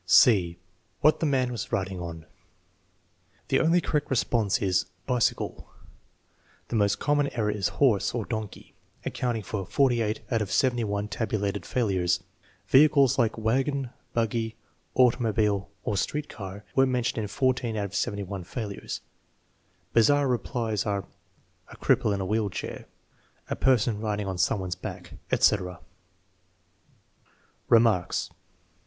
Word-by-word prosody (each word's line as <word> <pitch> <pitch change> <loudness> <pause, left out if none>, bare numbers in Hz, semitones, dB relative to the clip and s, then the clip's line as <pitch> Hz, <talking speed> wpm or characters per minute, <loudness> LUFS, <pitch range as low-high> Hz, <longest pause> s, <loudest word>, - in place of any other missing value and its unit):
(c) 90 -8 +5 0.4
What 155 - +5
the 160 - +1
man 130 -3 +1
was 115 -5 -5
riding 95 -1 -2
on 85 -2 -7 1.2
The - - +3
only 165 +2 +4
correct 150 -3 -1
response 115 -5 +1
is 95 -3 +1 0.2
"Bicycle." 125 -2 -1 1.0
The - - -2
most 100 -2 +2
common 145 -1 +1
error 110 -3 0
is 105 -3 0
horse 120 -6 +3
(or 115 -4 -2
donkey), 110 -3 -6 0.3
accounting 120 -3 -2
for 100 +1 -3
48 115 0 +1
out 115 -2 +2
of 100 - -3
71 110 -6 +1
tabulated 100 -4 -2
failures. 95 -6 +1 0.4
Vehicles, 140 -1 +5
like 115 -2 +2
wagon, 130 +4 0 0.2
buggy, 115 -1 -1 0.4
automobile, 110 -5 +2
or 105 - -1
street 150 +9 -1
car, 100 0 -8
were 135 0 +5
mentioned 125 -2 0
in 105 - -3
14 125 0 0
out 105 - -1
of 100 0 -7
71 100 -2 -2
failures. 100 +1 -5 0.9
Bizarre 140 +5 +4
replies 120 -4 -1
are: 100 -3 -2 0.6
"A - - -13
cripple - - +2
in 100 -1 -1
a - - -2
wheel 105 +1 0
chair"; - - -6 0.6
"A - - +1
person 120 -4 +2
riding 105 -1 -2
on 95 -2 -4
some 95 +2 +2
one's 90 -1 -3
back," - - -8 0.2
etc. 90 -4 +2 1.9
Remarks. 110 -6 +3
110 Hz, 130 wpm, -27 LUFS, 100-125 Hz, 1.9 s, c